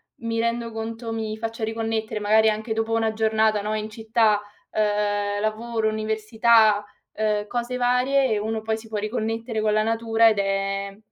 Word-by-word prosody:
mi 230 -1 -3
rendo 235 0 -1
conto, 225 +1 -5
mi 220 -1 -3
faccia 225 0 -5
riconnettere, 220 -1 -2
magari 220 +1 +4
anche 220 +1 -2
dopo 225 0 -1
una 225 -1 +1
giornata, 220 -1 +2
no, 215 +1 -2
in 215 0 -3
città, 220 -1 +1 0.3
uhm, 205 -1 0
lavoro, 220 +1 -1
università, 220 0 +3 0.3
uhm, 210 -1 -1
cose 240 +2 -3
varie, 250 -1 +2
uno 220 +1 -2
poi 220 0 -1
si 225 0 -12
può 215 - -4
riconnettere 225 +1 -3
con 215 -1 +1
la 215 - +3
natura 225 0 +3
ed 215 - 0
è 195 0 -1
220 Hz, 160 wpm, -24 LUFS, 215-225 Hz, 0.3 s, magari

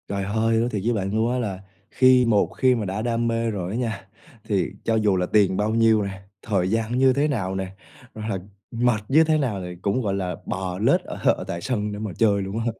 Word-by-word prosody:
Trời 100 -1 -2
ơi! 110 +3 +1
Nói 115 +2 +1
thiệt 105 -4 -3
với 120 - +2
bạn 100 -2 -2
luôn 110 +2 +1
á 125 - 0
là 100 -6 -3 0.3
khi 130 -1 +5
một 110 -3 +3
khi 130 -1 +4
mà 110 -3 -2
đã 95 +3 -3
đam 115 0 0
mê 115 0 0
rồi 95 -3 -4
á 110 - -2
nha, 110 -6 -3 0.4
thì 100 -6 -1
cho 115 - +1
dù 105 -3 +2
là 90 - +1
tiền 100 -1 +2
bao 105 +2 0
nhiêu 110 -2 +4
nè, 95 -1 -6 0.2
thời 95 -5 0
gian 115 +2 0
như 130 0 +5
thế 145 +3 +1
nào 100 -10 -2
nè, 95 0 -5 0.4
hoặc 110 0 -6
là 100 - -1 0.3
mệt 115 -2 +1
như 155 +4 +6
thế 160 -1 +2
nào 120 -10 -1
thì 90 -1 -7
cũng, 100 +7 0
gọi 100 -4 -1
là, 95 -2 -2
bò 95 -1 -4
lết 110 - +3
ở - - -8 0.2
ở - - -6
tại 85 - -4
sân 105 -1 -2
để 105 - -6
mà 110 -2 -4
chơi 100 -3 +3
luôn 100 +3 -4
á. 115 - -3
110 Hz, 255 wpm, -23 LUFS, 95-115 Hz, 0.4 s, như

